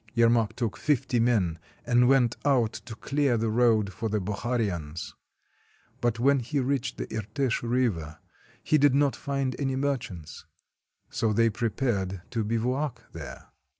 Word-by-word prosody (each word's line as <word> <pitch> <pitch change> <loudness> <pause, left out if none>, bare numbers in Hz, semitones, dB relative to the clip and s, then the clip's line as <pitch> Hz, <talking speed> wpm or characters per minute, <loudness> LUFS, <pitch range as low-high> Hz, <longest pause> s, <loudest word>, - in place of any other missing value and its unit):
Yermak 115 -2 +3
took 115 -4 -2
fifty 130 -4 +1
men 105 -9 +2 0.3
and 120 0 +4
went 125 -3 +4
out 125 -6 +2
to 110 +1 -8
clear 140 0 +1
the 110 0 0
road 110 -4 +3
for 110 +4 -3
the 105 0 0
Bokharians. 100 -6 -3 0.9
But 120 -2 +1
when 135 +3 +3
he 135 +4 -2
reached 130 -2 -1
the - - -3
Irtish 115 +4 -1
River 115 -11 -1 0.5
he 155 - +3
did 140 -1 +5
not 140 -1 +3
find 135 -2 -2
any 135 -2 0
merchants. 120 - -3 0.7
So 110 -2 0
they 115 +1 +3
prepared 105 -5 -1
to 115 -3 -1
bivouac 120 +3 -2
there. 80 -5 -9
115 Hz, 145 wpm, -27 LUFS, 105-130 Hz, 0.9 s, did